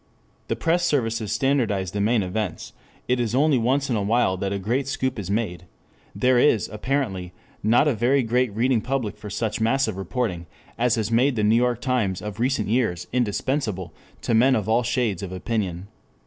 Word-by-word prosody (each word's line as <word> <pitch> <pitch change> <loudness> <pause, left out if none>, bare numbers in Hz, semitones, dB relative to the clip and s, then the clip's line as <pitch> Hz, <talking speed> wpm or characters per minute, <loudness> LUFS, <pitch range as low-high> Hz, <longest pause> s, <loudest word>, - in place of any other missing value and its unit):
The - - -1
press 170 +2 +1
services 115 - 0
standardize 115 -10 0
the 100 - -2
main 110 0 +2
events; 105 +4 -4 0.3
it 125 0 +1
is 120 -1 -1
only 145 -1 +3
once 135 +4 +1
in 120 - 0
a 105 - 0
while 105 -2 +2
that 95 +1 -2
a 100 - -1
great 120 +8 -1
scoop 130 -3 -2
is 95 -2 -5
made; 100 -4 -2 0.5
there 125 -1 +3
is 120 -5 +3
apparently 105 -7 -2 0.3
not 115 +7 +4
a 145 - +3
very 125 +5 +2
great 120 +1 +1
reading 120 0 +2
public 125 -4 -2
for 105 - -9
such 110 +1 -2
massive 115 -3 +1
reporting 95 -4 -3 0.3
as 120 -1 +2
has 110 -1 -2
made 125 +4 +3
the 105 - 0
New 105 +2 +4
York 120 0 +1
Times 120 -9 0
of 105 0 -7
recent 125 -3 0
years 110 -6 0
indispensable 110 - -1 0.3
to - - 0
men 130 +4 +5
of 105 -2 -2
all 115 +2 +3
shades 120 -6 -1
of 95 -2 -6
opinion. 95 -2 -3
115 Hz, 190 wpm, -24 LUFS, 100-125 Hz, 0.5 s, men